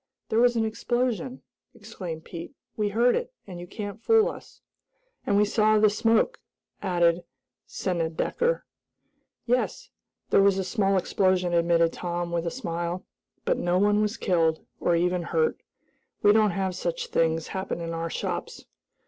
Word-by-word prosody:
"There 220 - +2
was 245 0 +4
an 225 -1 +1
explosion!" 245 +3 -2 0.3
exclaimed 190 -8 -7
Pete. 170 +10 -8 0.2
"We 210 -1 0
heard 235 +4 +3
it, - - -3
and 180 -3 -8
you 175 - -8
can't 205 +2 -6
fool 450 - +4
us!" - - -11 0.7
"And 200 - +3
we 210 - +5
saw 215 +1 +3
the 210 -1 +5
smoke," 225 - +2 0.4
added 175 -2 +2 0.4
Snedecker. 180 - -1 0.8
"Yes, 250 - -1 0.4
there - - +6
was 195 -1 +4
a 190 - 0
small 195 0 +1
explosion," 185 -1 +1
admitted 170 -1 +3
Tom, 175 -1 -3
with 170 0 -1
a - - +2
smile, 175 -5 -4 0.4
"but - - +1
no 175 +1 +1
one 205 +2 +3
was 210 +1 -1
killed; 165 -4 +1
or 175 - +2
even 180 +1 +1
hurt. 470 - 0 0.6
We 205 - +7
don't 215 -1 +4
have 190 0 -1
such 485 - -3
things 160 -1 +1
happen 190 -3 -3
in 165 0 -4
our 165 0 -3
shops." - - -4
195 Hz, 155 wpm, -26 LUFS, 175-225 Hz, 0.8 s, We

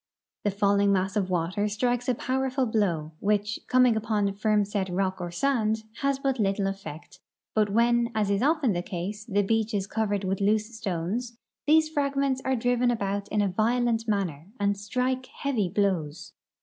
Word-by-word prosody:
The 205 - +2
falling 200 0 +2
mass 190 +1 0
of 195 -3 0
water 180 +4 0
strikes 245 +4 0
a 250 - +2
powerful 265 +2 0
blow, 180 -9 0
which, 210 +1 0
coming 255 -2 +4
upon 215 -2 0
firm 210 0 +2
set 195 -2 -2
rock 185 +1 -1
or 175 - -3
sand, 220 +2 0
has 275 -1 0
but 270 -2 -1
little 195 -1 +1
effect; 195 -5 -6 0.3
but 215 -1 +3
Avhen, 235 +3 +2
as 210 -2 +1
is 200 - +1
often 285 -5 +2
the 175 - -1
case, 200 +3 -5
the 205 -3 +1
beach 220 +1 0
is 195 -2 0
covered 205 -1 -1
Avith 195 +1 -1
loose 215 +3 +1
stones, 220 +5 -3 0.3
these 315 +1 +5
fragments 280 -3 0
are 265 0 +1
driven 245 +1 +2
about 200 -3 -1
in 210 -1 +1
a - - +2
violent 230 +3 +1
manner 180 -7 -1
and 200 0 +2
strike 255 +5 -2 0.2
heaA'y 225 -10 0
bloAvs. 175 -7 -1
210 Hz, 175 wpm, -27 LUFS, 195-245 Hz, 0.3 s, these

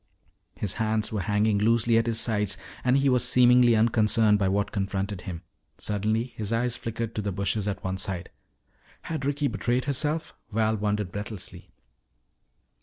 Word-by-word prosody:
His 100 -3 -3
hands 110 -1 0
were 105 -2 -1
hanging 105 +1 +1
loosely 115 +2 +3
at 115 - -1
his 115 -1 +1
sides 105 -4 0 0.3
and 125 +1 +3
he 140 0 +2
was 125 -2 +3
seemingly 125 -1 +5
unconcerned 110 -1 +3
by 95 - +2
what 100 +1 0
confronted 100 -1 -2
him. 90 -4 -7 0.3
Suddenly 105 +2 -1
his 105 -1 -4
eyes 120 +1 0
flickered 115 0 -4
to 110 - -2
the 100 -1 -2
bushes 100 +2 -1
at 100 - -3
one 95 0 -2
side. 95 -3 -3 0.7
Had 155 -4 -4
Ricky 145 +1 0
betrayed 125 -1 -1
herself, 150 +3 -1 0.2
Val 110 +1 +1
wondered 105 -2 -1
breathlessly. 105 -1 -7
110 Hz, 160 wpm, -26 LUFS, 100-120 Hz, 0.7 s, seemingly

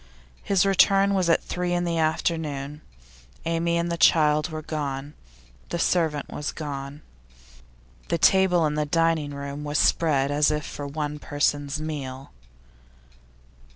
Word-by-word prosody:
His 195 -1 +2
return 195 +1 +4
was 185 -3 +1
at 165 - +3
three 180 0 -2
in 175 0 0
the 170 -1 -1
afternoon. 155 -2 -2 0.6
Amy 165 +1 0
and 170 0 -1
the 170 - -2
child 150 0 +4
were 155 -1 -6
gone; 145 -2 -4 0.6
the 170 - -2
servant 160 -4 0
was 150 - -4
gone. 140 -1 -7 1.0
The 170 - 0
table 180 0 +4
in 150 - 0
the 150 0 0
dining 165 -2 +1
room 140 +1 -6
was 150 0 -2
spread 145 -4 +2
as 145 +1 +3
if 150 0 -2
for 145 - -6
one 150 0 -4
person's 145 0 -1
meal. 135 -4 -6
155 Hz, 140 wpm, -25 LUFS, 145-170 Hz, 1.0 s, return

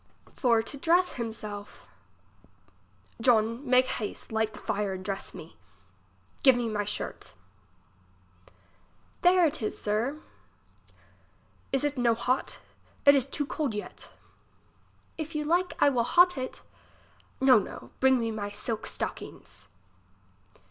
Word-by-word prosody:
For 235 -4 +3
to 280 - -6
dress 345 +5 +3
him 235 -2 -4
self. 205 -2 -8 1.4
John, 230 +1 +3
make 255 0 +5
haste, 215 -4 -5
lighted 220 -1 0
the - - -10
fire 200 -1 -2
and 185 0 -7
dress 195 0 -5
me. 160 - -11 0.8
Give 265 -2 +7
me 240 -1 -1
my 210 -2 -1
shirt. 200 - -5 1.9
There 360 0 +5
is 310 -3 0
it 215 - -1
sir. 225 +8 -1 1.5
Is 270 0 +1
it 290 -2 -1
no 235 -2 +3
hot, 255 +3 -1 0.5
it 285 - +9
is 270 -2 +2
too 290 +1 -2
cold 280 -6 -2
yet. 210 - -6 1.1
If 315 0 -5
you 300 - 0
like, 350 +4 +1
I - - +6
will 250 -4 +1
hot 355 +8 +5
it. 260 -1 -5 0.8
No, 260 -3 +6
no, 200 - -8
bring 265 0 +5
me 230 -1 -1
my 205 -2 -4
silk 215 +2 -3
stocking's. - - -6
245 Hz, 130 wpm, -28 LUFS, 215-285 Hz, 1.9 s, it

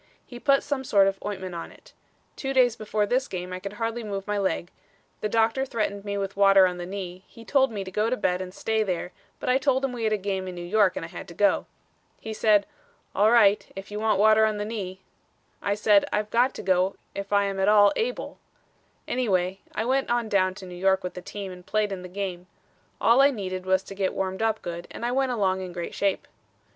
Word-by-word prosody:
He 245 - -10
put 275 +1 +3
some 285 -2 -2
sort 200 -6 +4
of 195 0 -1
ointment 190 -3 -5
on 170 - -6
it. - - -19 0.4
Two 270 -1 -3
days 250 -3 +4
before 215 -2 -1
this 255 +5 0
game 180 0 -5
I 185 - -4
could 200 +1 -7
hardly 230 +2 -3
move 200 -2 -4
my 210 0 -1
leg; 190 -2 -1 0.5
the 215 - -2
doctor 225 +4 +2
threatened 215 -6 -2
me 200 0 -2
with 195 0 -3
water 195 -1 +6
on 180 -1 -1
the 175 - -5
knee; 185 -1 -6
he 230 - -14
told 270 -3 +3
me 205 -3 -4
to 190 - -8
go 210 +4 +1
to 255 - 0
bed 180 -2 0
and 185 -1 -6
stay 220 +3 -1
there, 180 -3 -2 0.3
but - - -6
I 255 +1 +3
told 270 -1 +2
him 270 - -2
we 235 -2 -3
had 215 - +1
a - - +2
game 190 -1 -3
in 180 - -6
New 175 0 -6
York 195 0 +3
and - - -4
I - - -7
had 175 +2 -9
to 170 - -11
go. 205 +2 +2 0.5
He 220 - -6
said, 210 -2 +3 0.5
'All 210 +2 +4
right, 210 -3 +4
if 195 +1 -8
you 210 - -4
want 215 -2 +2
water 215 +2 +5
on 215 -1 +2
the 205 - -3
knee.' 190 -4 -5 0.6
I 200 - 0
said, 210 -1 +4
'I've 210 0 -1
got 245 +3 +2
to - - -7
go 185 0 +2 0.2
if 200 0 -6
I 200 0 +4
am 195 -1 -2
at 190 - +2
all 205 -1 +6
able.' 480 +2 -3 0.7
Anyway, 190 -6 0 0.2
I 220 - -1
went 265 +2 +1
on 240 -2 0
down 185 -2 +2
to 195 -2 -9
New 180 - -9
York 190 +2 +1
with 180 - -4
the 180 - -7
team 195 0 -7
and 180 0 -11
played 210 +1 0
in 190 -2 -4
the 180 - -9
game. 185 -2 -5 0.5
All 235 +4 +5
I 280 - +7
needed 185 -7 -5
was 190 0 +3
to 195 - -9
get 195 -1 -1
warmed 190 +1 -2
up 225 -1 0
good 170 0 -6
and 235 - -6
I 240 - 0
went 265 0 +1
along 190 -5 +1
in 185 -1 -6
great 175 -1 -5
shape." 200 -1 -1
200 Hz, 245 wpm, -26 LUFS, 185-225 Hz, 0.7 s, I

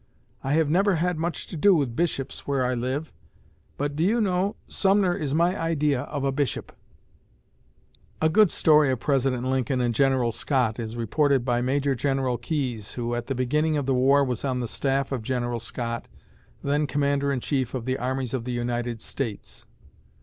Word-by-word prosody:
I 135 - 0
have 160 0 +3
never 190 +5 +3
had 175 0 0
much 170 +1 -2
to - - -8
do 190 +5 +5
with 135 -7 0
Bishops 155 -5 -2
where 135 -2 +1
I 125 - 0
live, 130 +6 -3 0.6
but, 145 0 -2
do 155 - 0
you 220 +6 +2
know, 195 -1 +1
Sumner 195 -2 +2
is 145 -3 -2
my 170 +3 +3
idea 150 -6 0
of 145 -2 -4
a 135 - +1
Bishop." 135 -3 -2 1.5
A 160 - +3
good 210 +4 +5
story 150 -3 +4
of 130 -2 0
President 135 -2 +1
Lincoln 130 0 0
and 120 -1 +1
General 130 -1 +2
Scott 120 -2 0
is 115 0 -5
reported 130 +3 +1
by 120 -1 +1
Major 135 +2 +1
General 130 -1 0
Keyes, 120 -6 -3
who 120 -1 -3
at 120 0 -3
the 135 - -2
beginning 150 +5 +1
of 145 - -1
the 135 - +1
war 135 +3 +4
was 125 -4 -2
on 130 -2 -1
the 120 - -2
staff 135 +3 -1
of 130 -4 -2
General 120 0 -2
Scott, 115 0 -4 0.6
then 145 +1 +1
commander 140 0 +1
in 135 - 0
chief 130 -1 -1
of 120 -3 -4
the 130 0 -1
armies 130 0 -2
of 130 -3 -2
the 125 - -4
United 120 -1 -2
States. 115 -7 -5
135 Hz, 185 wpm, -25 LUFS, 125-150 Hz, 1.5 s, do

